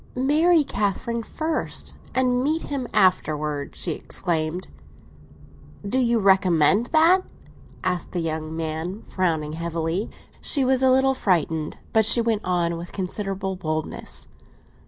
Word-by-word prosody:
"Marry 305 +6 +4
Catherine 220 0 -1
first 315 +7 -3 0.2
and 250 -1 +2
meet 310 +3 0
him 275 -4 -3
afterwards!" 150 -6 +1
she 175 - -2
exclaimed. 165 +2 -3 1.2
"Do 255 +6 +1
you 235 -2 +3
recommend 190 0 +4
that?" 330 +6 +5 0.6
asked 180 -2 -2
the 180 - -2
young 160 -1 -3
man, 165 +5 -4
frowning 160 -5 -1
heavily. 170 +4 -2 0.3
She 275 -3 +2
was 260 0 +3
a 260 - +5
little 265 +1 +4
frightened, 165 - 0 0.2
but 220 -1 +5
she 235 - +4
went 225 -2 0
on 170 -2 0
with 170 +1 -8
considerable 195 0 -3
boldness. 155 -3 -4
190 Hz, 125 wpm, -24 LUFS, 165-250 Hz, 1.2 s, that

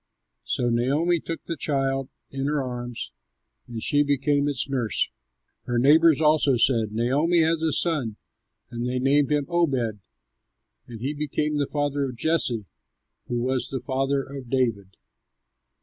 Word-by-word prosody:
So 120 -1 0
Naomi 145 +9 +2
took 165 +1 -6
the 165 - -3
child 135 -2 -1 0.2
in 135 0 -2
her 150 0 0
arms 120 -2 -5 0.6
and 115 -2 -6
she 145 - +3
became 145 0 +1
its 140 -3 -1
nurse. 125 -7 0 0.5
Her 120 - -1
neighbors 150 +4 +5
also 150 -4 +3
said, 115 -3 +2
"Naomi 140 +10 +2
has 160 0 +2
a 160 -1 +1
son!" 140 -9 0 0.6
and 120 0 -3
they 125 - -1
named 140 +2 +2
him 145 -1 +1
Obed; 135 -11 0 0.9
he 120 +5 -4
became 150 0 -1
the 145 -1 0
father 145 -1 -1
of 130 -2 -5
Jesse, 120 -6 0 0.6
who 120 -1 -1
was 130 -1 0
the 135 - -3
father 135 +2 -1
of 135 -2 -9
David. 115 -8 -1
135 Hz, 145 wpm, -25 LUFS, 120-150 Hz, 0.9 s, neighbors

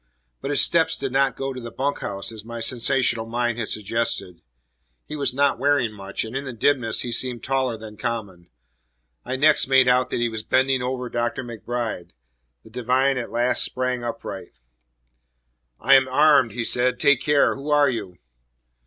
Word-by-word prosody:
But 135 - -4
his 145 - +3
steps 165 -1 +1
did 135 - -4
not 135 -1 +1
go 135 0 -3
to 130 - -8
the 120 - -7
bunk 140 +4 -2
house, 100 0 -4
as 110 -2 -10
my 115 +1 -7
sensational 120 -1 +1
mind 120 0 -1
had 110 - -2
suggested. 105 -4 -2 0.6
He 150 - -7
was 140 -2 -1
not 140 0 +1
wearing 140 -4 +2
much, 100 -1 -5
and 110 +3 -8
in 135 - -2
the 130 -2 -6
dimness 120 -1 +1
he 120 - -4
seemed 120 0 -1
taller 130 -3 -1
than 110 -1 -11
common. 100 -7 -5 0.8
I 130 - -3
next 150 +2 +3
made 130 -1 +5
out 125 0 +3
that - - -2
he 120 0 +1
was 110 -1 -5
bending 130 +3 +1
over 125 0 -3
Dr. 120 +2 -2
MacBride. 115 -6 -5 0.5
The 110 - -17
divine 130 +3 +1
at 120 - -5
last 120 +1 +1
sprang 125 -1 -2
upright. 115 -1 -6 1.3
"I 135 - +4
am 135 -1 +6
armed," 140 -4 +4
he 120 - -3
said. 125 +2 +1
"Take 140 -3 +4
care. 150 -3 +3
Who 140 +2 -7
are 145 -1 +4
you?" 105 -8 -4
125 Hz, 180 wpm, -23 LUFS, 115-135 Hz, 1.3 s, am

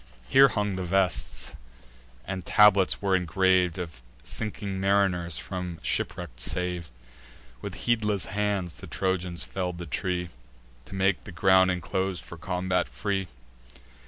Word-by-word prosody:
Here 135 +1 +7
hung 105 -5 -1
the 95 - -2
vests, 95 0 0 0.7
and 95 -1 -4
tablets 100 0 +5
were 95 -1 +3
engrav'd, 90 -1 +2
Of 80 -8 -6 0.2
sinking 100 -3 -3
mariners 95 -5 +2
from 85 +7 -5
shipwreck - - -1
sav'd. 90 +5 -2 0.7
With - - -6
heedless 105 -5 +1
hands 100 -3 -1
the - - -11
Trojans 90 -4 -1
fell'd 90 -2 -3
the 85 - -6
tree, 90 +3 -2 0.6
To 95 - -9
make 95 -1 +2
the - - -8
ground 95 +1 +5
enclos'd 95 +1 -2
for 85 - -11
combat 90 +1 -1
free. 100 -2 -2
95 Hz, 130 wpm, -27 LUFS, 90-95 Hz, 0.7 s, Here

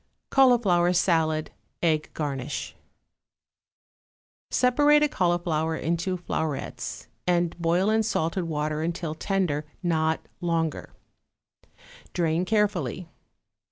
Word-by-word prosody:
=Cauliflower 215 -10 +4
Salad, 160 -3 +1 0.3
Egg 155 -2 +1
Garnish.= 145 -2 -4 1.7
Separate 290 +4 +4
a - - +5
cauliflower 170 - 0
into 170 +3 -1
flowerets 160 -4 -4 0.2
and 175 -1 +2
boil 175 +5 +2
in 220 0 +3
salted 180 -4 -1
water 155 -1 -2
until 165 -1 -2
tender, 160 -3 -1 0.2
not 160 -2 0
longer. 165 -3 -2 1.2
Drain 170 0 +1
carefully. 185 - 0
170 Hz, 90 wpm, -26 LUFS, 160-185 Hz, 1.7 s, a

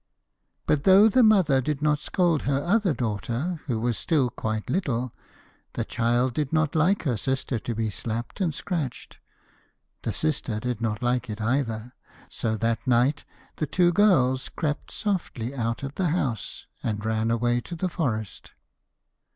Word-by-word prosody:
But 145 -2 +1
though 195 +3 +7
the 255 +5 +4
mother 185 - +5
did 145 +2 -2
not 150 -1 +2
scold 170 -3 +1
her 140 0 +1
other 200 0 +2
daughter 120 - -2
who 120 -5 0
was 120 0 -1
still 140 -8 +1
quite 110 -1 -3
little, 130 -10 -1 0.6
the - - -2
child 120 +2 +1
did 150 -1 -1
not 155 -2 +1
like 170 +6 +2
her 130 -7 +1
sister 130 +1 -1
to 115 +1 -4
be 110 -1 -1
slapped 115 - -4
and 175 -4 +2
scratched. 150 -3 -4 0.8
The - - -2
sister 135 -8 -1
did 125 -1 -3
not 115 +1 -2
like 125 0 0
it 105 0 -5
either; 115 0 -1 0.4
so 110 -1 -2
that 115 +2 -1
night 125 +4 +2 0.3
the 155 - -1
two 175 +4 +3
girls 130 -11 +3
crept 150 -2 -3
softly 165 - -2
out 115 -1 -2
of 135 0 -4
the 180 0 0
house 130 - -2 0.2
and 105 -1 -3
ran 110 0 0
away 120 +1 +1
to 170 - -7
the 185 +3 -1
forest. 115 - -3
130 Hz, 160 wpm, -26 LUFS, 115-160 Hz, 0.8 s, though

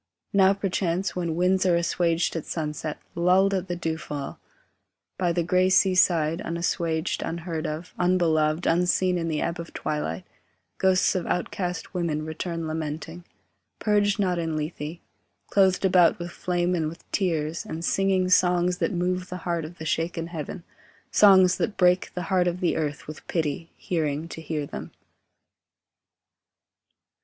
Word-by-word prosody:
Now 195 -1 +5
perchance, 190 -1 -1
when 170 -3 -2
winds 185 +2 +2
are 180 -2 +3
assuaged 170 0 +1
at 165 - -4
sunset, 150 -1 -3 0.2
Lulled 185 +3 +3
at 190 -1 -1
the 175 - -2
dewfall, 160 -4 -4 0.8
By 180 -2 +2
the 170 0 0
grey 185 +2 +3
sea 190 0 +4
side, 165 -2 +3
unassuaged, 165 -1 -1
unheard 165 -1 -3
of, 155 +4 -6
Unbeloved, 165 -3 +2
unseen 180 +1 +2
in 165 - -2
the 155 -2 -1
ebb 170 - -2
of 170 - -8
twilight, 155 +4 -3 0.5
Ghosts 190 -1 +3
of 185 - -2
outcast 180 +1 -3
women 160 -4 -1
return 165 +1 -4
lamenting, 160 +2 -5 0.5
Purged 205 -1 +2
not 185 -4 +1
in 165 -2 -2
Lethe, 155 +1 -4 0.5
Clothed 190 -1 +3
about 180 -3 +5
with 175 0 -6
flame 175 0 -1
and 160 -3 0
with 165 - -12
tears, 165 -4 -1
and 165 +2 -5
singing 190 -1 +2
Songs 180 0 +3
that - - 0
move 180 0 -1
the 180 - -5
heart 170 -2 -1
of 170 +3 -10
the 160 - -7
shaken 165 +1 -1
heaven, 165 +3 -5 0.5
Songs 190 -3 +6
that 220 - -2
break 180 0 +3
the 180 - -3
heart 180 -1 +3
of 175 +1 -1
the 180 - +1
earth 150 -2 -3
with 155 0 -10
pity, 165 0 -2
Hearing, 155 -2 -2
to 165 - -7
hear 155 -2 -3
them. - - -7
175 Hz, 150 wpm, -25 LUFS, 160-185 Hz, 0.8 s, Songs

